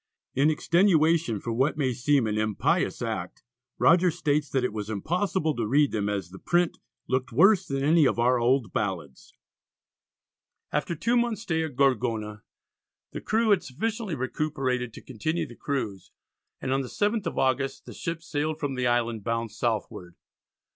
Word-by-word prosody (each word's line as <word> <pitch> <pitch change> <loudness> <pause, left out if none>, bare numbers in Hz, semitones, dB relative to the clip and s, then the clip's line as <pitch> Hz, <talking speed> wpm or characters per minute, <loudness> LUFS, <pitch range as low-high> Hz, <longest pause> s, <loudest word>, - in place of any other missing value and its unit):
In 140 +4 +3
extenuation 165 - +3
for 115 +3 -4
what 130 +6 +1
may 130 -4 +1
seem 135 +1 +2
an 105 -1 -1
impious 110 -1 0
act, - - -4 0.3
Rogers 175 -1 +4
states 150 -2 0
that 130 -2 0
it 125 - -1
was 105 -1 -5
impossible 160 - -1
to 115 -3 -2
read 145 +4 +3
them 105 -2 -1
as 100 -4 -3
the 95 - -11
print 175 -1 +1 0.3
"looked 130 +2 -1
worse 195 -1 +5
than 135 0 -2
any 155 0 +5
of - - 0
our 125 +1 +3
old 120 -1 +1
ballads." 85 -10 -4 1.4
After 170 - -1
two 230 +10 0
months' 235 -2 0
stay 160 -6 0
at 155 -5 -5
Gorgona 115 -6 0 0.7
the - - -6
crew 220 0 +1
had 195 -3 +4
sufficiently 210 - -3
recuperated 130 -2 -2
to - - -11
continue 155 +7 -2
the 120 - -12
cruise, 110 -11 -4 0.5
and 130 - -2
on 135 - +1
the 130 - -5
7th 210 - -1
of - - -4
August 135 +1 0
the - - -9
ships 165 -1 -5
sailed 155 0 -2
from 145 -3 -2
the 125 -1 0
island, 120 -3 0
bound 115 0 -2
southward. 110 -6 -3
135 Hz, 170 wpm, -27 LUFS, 115-165 Hz, 1.4 s, worse